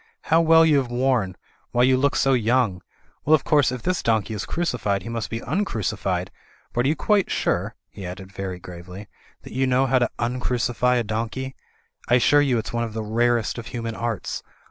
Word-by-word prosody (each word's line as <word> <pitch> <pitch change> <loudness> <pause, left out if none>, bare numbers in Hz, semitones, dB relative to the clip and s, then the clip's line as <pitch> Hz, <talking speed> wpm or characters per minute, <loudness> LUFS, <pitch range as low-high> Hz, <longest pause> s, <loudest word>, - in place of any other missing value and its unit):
"How 165 - +6
well 165 0 +6
you 155 -3 +4
have 130 -3 0
worn; 120 -6 +1 0.3
why, 120 - +2
you 130 +1 +5
look 140 +2 +1
quite 135 - +3
young! 110 -5 +1 0.4
Well, 155 - +5
of 150 - -2
course, 145 -5 +3
if 125 -2 -5
this 180 -1 0
donkey 110 -1 0
is 105 - -4
crucified, 110 - -1
he 115 - -7
must 115 -2 -3
be 115 0 -4
uncrucified. 105 - -2 0.4
But 120 +1 +1
are - - +3
you 150 - +2
quite 205 +3 +2
sure," - - -1
he 100 - -11
added, 95 +1 -7
very 95 -2 -5
gravely, 90 +3 -10 0.4
"that - - -11
you 130 +1 +1
know 130 +1 +3
how 130 0 +3
to 120 - +1
uncrucify 125 0 0
a - - 0
donkey? 115 +5 -3 0.6
I 120 - +5
assure 145 +4 +5
you 135 -4 +2
it's 110 - -4
one 120 0 0
of 115 -2 -5
the 110 - -2
rarest 120 +2 +1
of 115 - -8
human 115 -2 -4
arts. 115 -3 -3
120 Hz, 205 wpm, -23 LUFS, 110-130 Hz, 0.6 s, How